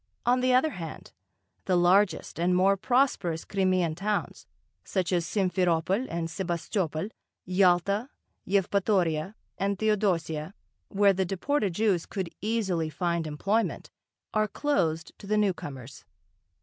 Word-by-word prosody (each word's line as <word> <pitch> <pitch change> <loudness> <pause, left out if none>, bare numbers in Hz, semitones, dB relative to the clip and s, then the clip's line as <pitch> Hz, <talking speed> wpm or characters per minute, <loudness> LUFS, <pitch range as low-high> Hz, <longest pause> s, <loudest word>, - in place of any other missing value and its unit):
On 250 +1 +3
the 255 0 +2
other 260 +5 +3
hand, 165 -6 -8 0.5
the 185 - +2
largest 180 0 +2
and 180 +1 +2
more 195 +2 +4
prosperous 200 -7 +1
Crimean 185 -4 +1
towns, 200 +5 -3 0.4
such 185 -2 -1
as 170 -2 +1
Simferopol 185 +2 +1
and 165 -1 -2
Sebastopol, 170 0 -2 0.4
Yalta, 185 +5 +2 0.4
Yevpatoria, 190 -3 +1 0.2
and 200 0 0
Theodosia, 190 -6 0 0.3
where 200 0 +4
the 190 0 0
deported 195 - -1
Jews 200 -5 +1
could 190 -4 -4
easily 195 -7 0
find 170 0 -1
employment, 200 +9 -1 0.4
are 215 0 +2
closed 175 - -1
to 200 - -11
the 215 +1 +1
newcomers. 145 - -3
190 Hz, 120 wpm, -28 LUFS, 170-205 Hz, 0.5 s, more